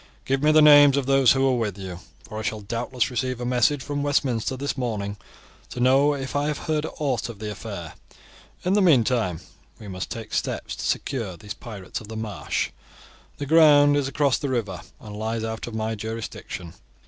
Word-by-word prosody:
Give 135 Hz, 0 st, 0 dB
me 150 Hz, +1 st, +4 dB
the 155 Hz, 0 st, +6 dB
names 145 Hz, -2 st, +8 dB
of 140 Hz, -, 0 dB
those 135 Hz, -2 st, +5 dB
who 135 Hz, 0 st, +2 dB
were 130 Hz, -1 st, +3 dB
with 105 Hz, -4 st, -2 dB
you, 95 Hz, -3 st, -7 dB, 0.2 s
for 110 Hz, -1 st, -7 dB
I -, -, -3 dB
shall 110 Hz, 0 st, -3 dB
doubtless 120 Hz, +4 st, -2 dB
receive 125 Hz, +1 st, -2 dB
a 120 Hz, -, -4 dB
message 125 Hz, +3 st, +2 dB
from 145 Hz, -1 st, -3 dB
Westminster 130 Hz, -4 st, 0 dB
this 140 Hz, +2 st, -2 dB
morning 105 Hz, -6 st, -3 dB, 0.5 s
to -, -, -7 dB
know 135 Hz, +4 st, +4 dB
if 135 Hz, -1 st, -5 dB
I 145 Hz, +1 st, +1 dB
have 150 Hz, -1 st, -1 dB
heard 155 Hz, 0 st, -1 dB
aught 130 Hz, -6 st, -1 dB
of 115 Hz, -, -8 dB
the 105 Hz, 0 st, -5 dB
affair. 95 Hz, -5 st, -7 dB, 0.7 s
In 185 Hz, -, +2 dB
the 205 Hz, -, +4 dB
meantime 120 Hz, -, +3 dB, 0.4 s
we 105 Hz, -, -11 dB
must 95 Hz, -1 st, -5 dB
take 115 Hz, -3 st, -7 dB
steps -, -, -2 dB
to -, -, -7 dB
secure 115 Hz, -10 st, -2 dB
these 105 Hz, +4 st, -7 dB
pirates 100 Hz, -6 st, -7 dB
of 105 Hz, -, -11 dB
the 110 Hz, 0 st, -7 dB
marsh. 110 Hz, -3 st, -3 dB, 0.7 s
The 145 Hz, -, -4 dB
ground 145 Hz, -2 st, +6 dB
is 145 Hz, -2 st, +1 dB
across 140 Hz, 0 st, +1 dB
the 140 Hz, -, -3 dB
river, 105 Hz, -9 st, -2 dB, 0.2 s
and 105 Hz, -1 st, -9 dB
lies 110 Hz, +1 st, -3 dB
out 110 Hz, +1 st, -4 dB
of 115 Hz, -, -6 dB
my 110 Hz, 0 st, -1 dB
jurisdiction." 110 Hz, -5 st, -6 dB
120 Hz, 200 wpm, -24 LUFS, 110-140 Hz, 0.7 s, names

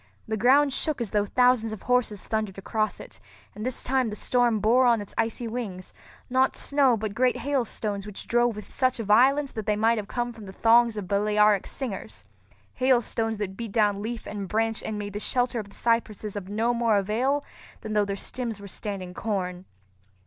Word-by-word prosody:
The 220 Hz, -, -1 dB
ground 265 Hz, +5 st, +4 dB
shook 305 Hz, 0 st, -1 dB
as 235 Hz, -4 st, -3 dB
though 205 Hz, -1 st, +1 dB
thousands 245 Hz, -1 st, +3 dB
of 215 Hz, -, -9 dB
horses 250 Hz, -5 st, 0 dB
thundered 215 Hz, -3 st, -2 dB
across 215 Hz, +2 st, -2 dB
it; -, -, -11 dB, 0.3 s
and 210 Hz, -, -7 dB
this 255 Hz, 0 st, -2 dB
time 260 Hz, -2 st, +1 dB
the 210 Hz, -, -5 dB
storm 240 Hz, -1 st, +2 dB
bore 240 Hz, +5 st, +4 dB
on 235 Hz, -2 st, +4 dB
its 205 Hz, -, -8 dB
icy 230 Hz, +1 st, -1 dB
wings, 215 Hz, -6 st, -6 dB, 0.3 s
not 260 Hz, +1 st, +2 dB
snow, 275 Hz, -4 st, +3 dB
but 215 Hz, -1 st, -4 dB
great 250 Hz, +2 st, +2 dB
hailstones 215 Hz, -7 st, -2 dB
which 210 Hz, -, -8 dB
drove 240 Hz, -1 st, +2 dB
with 210 Hz, -, -7 dB
such 255 Hz, -1 st, 0 dB
violence 255 Hz, +6 st, +3 dB
that 220 Hz, -2 st, -6 dB
they 210 Hz, -, +2 dB
might 225 Hz, +2 st, +2 dB
have 205 Hz, -, -6 dB
come 240 Hz, +2 st, -3 dB
from 220 Hz, -3 st, -11 dB
the 190 Hz, -, -9 dB
thongs 230 Hz, +1 st, +4 dB
of 200 Hz, -3 st, -4 dB
Balearic 210 Hz, 0 st, +3 dB
slingers—hailstones 235 Hz, 0 st, -2 dB
that 195 Hz, -2 st, -4 dB
beat 225 Hz, -1 st, -6 dB
down 205 Hz, -3 st, +2 dB
leaf 230 Hz, +2 st, -5 dB
and 200 Hz, -2 st, -5 dB
branch 225 Hz, +2 st, 0 dB
and 215 Hz, -, -4 dB
made 205 Hz, -1 st, -5 dB
the 205 Hz, -, -3 dB
shelter 245 Hz, +1 st, 0 dB
of 205 Hz, -2 st, -7 dB
the -, -, -14 dB
cypresses 220 Hz, -3 st, -1 dB
of 195 Hz, -2 st, -6 dB
no 225 Hz, +4 st, +1 dB
more 230 Hz, -3 st, +2 dB
avail 245 Hz, +9 st, 0 dB, 0.4 s
than 215 Hz, -, -5 dB
though 210 Hz, -1 st, +3 dB
their 200 Hz, 0 st, -3 dB
stems 230 Hz, +1 st, -4 dB
were 200 Hz, -, -9 dB
standing 195 Hz, -2 st, -5 dB
corn. 185 Hz, -3 st, -3 dB
220 Hz, 195 wpm, -26 LUFS, 205-245 Hz, 0.4 s, ground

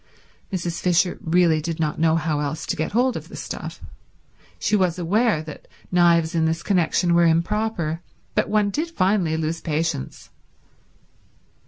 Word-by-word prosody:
Mrs. 175 Hz, -3 st, -3 dB
Fisher 180 Hz, 0 st, +2 dB
really 165 Hz, -1 st, +3 dB
did 165 Hz, +1 st, -4 dB
not 155 Hz, -1 st, -1 dB
know 160 Hz, 0 st, +3 dB
how 155 Hz, -2 st, 0 dB
else 150 Hz, +1 st, -3 dB
to -, -, -2 dB
get 155 Hz, +5 st, -3 dB
hold 250 Hz, +3 st, +2 dB
of -, -, -6 dB
the -, -, -10 dB
stuff. -, -, -7 dB, 0.7 s
She 210 Hz, -, +1 dB
was 185 Hz, -4 st, +1 dB
aware 185 Hz, 0 st, +1 dB
that 155 Hz, -1 st, -10 dB, 0.2 s
knives 170 Hz, -2 st, +4 dB
in 165 Hz, -1 st, +2 dB
this 160 Hz, +1 st, -1 dB
connection 175 Hz, -2 st, +2 dB
were 170 Hz, 0 st, +5 dB
improper, 170 Hz, -1 st, 0 dB, 0.3 s
but -, -, 0 dB
one 210 Hz, -1 st, +2 dB
did 315 Hz, +9 st, -2 dB
finally 185 Hz, -, +1 dB
lose 160 Hz, +1 st, -2 dB
patience. 155 Hz, -, -3 dB
170 Hz, 155 wpm, -23 LUFS, 160-190 Hz, 0.7 s, were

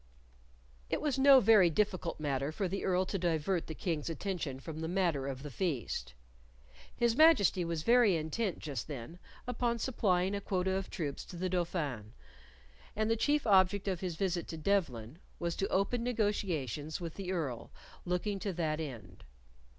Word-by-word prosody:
It -, -, 0 dB
was 285 Hz, -3 st, -1 dB
no 275 Hz, 0 st, +8 dB
very 210 Hz, -6 st, +6 dB
difficult 185 Hz, -1 st, -1 dB
matter 140 Hz, -1 st, -1 dB
for 190 Hz, +4 st, -2 dB
the 195 Hz, +2 st, -3 dB
Earl 185 Hz, 0 st, +2 dB
to 195 Hz, +1 st, -3 dB
divert 170 Hz, +1 st, 0 dB
the 160 Hz, -, -6 dB
King's 165 Hz, -3 st, -2 dB
attention 165 Hz, -5 st, -3 dB
from 155 Hz, +2 st, -7 dB
the 160 Hz, -, -3 dB
matter 170 Hz, -7 st, 0 dB
of 135 Hz, 0 st, -5 dB
the 145 Hz, -, -7 dB
feast. 120 Hz, -, -3 dB, 0.8 s
His 235 Hz, -1 st, +2 dB
Majesty 265 Hz, -, +5 dB
was 165 Hz, -2 st, -3 dB
very 235 Hz, -4 st, +5 dB
intent 165 Hz, +5 st, -2 dB
just 140 Hz, -7 st, -5 dB
then 150 Hz, +4 st, -7 dB, 0.3 s
upon 240 Hz, -1 st, -1 dB
supplying 195 Hz, -6 st, +1 dB
a 200 Hz, -, -2 dB
quota 190 Hz, -1 st, -1 dB
of 190 Hz, 0 st, -2 dB
troops 150 Hz, -6 st, -4 dB
to -, -, -10 dB
the 185 Hz, +2 st, -2 dB
Dauphin, 150 Hz, -, -2 dB, 0.8 s
and 215 Hz, +1 st, +1 dB
the -, -, +4 dB
chief 290 Hz, +6 st, +1 dB
object 195 Hz, -1 st, +4 dB
of 185 Hz, -3 st, -1 dB
his 180 Hz, -3 st, -3 dB
visit 175 Hz, -1 st, -1 dB
to 160 Hz, -, -6 dB
Devlen 155 Hz, -, -1 dB, 0.2 s
was 170 Hz, -1 st, -2 dB
to 195 Hz, -, 0 dB
open 200 Hz, +5 st, 0 dB
negotiations 180 Hz, -, -1 dB
with 170 Hz, -3 st, -5 dB
the 190 Hz, -2 st, -5 dB
Earl 145 Hz, -10 st, -3 dB, 0.3 s
looking 190 Hz, +3 st, -1 dB
to 195 Hz, 0 st, -3 dB
that 160 Hz, -2 st, -1 dB
end. 115 Hz, -, -7 dB
180 Hz, 170 wpm, -32 LUFS, 155-200 Hz, 0.8 s, no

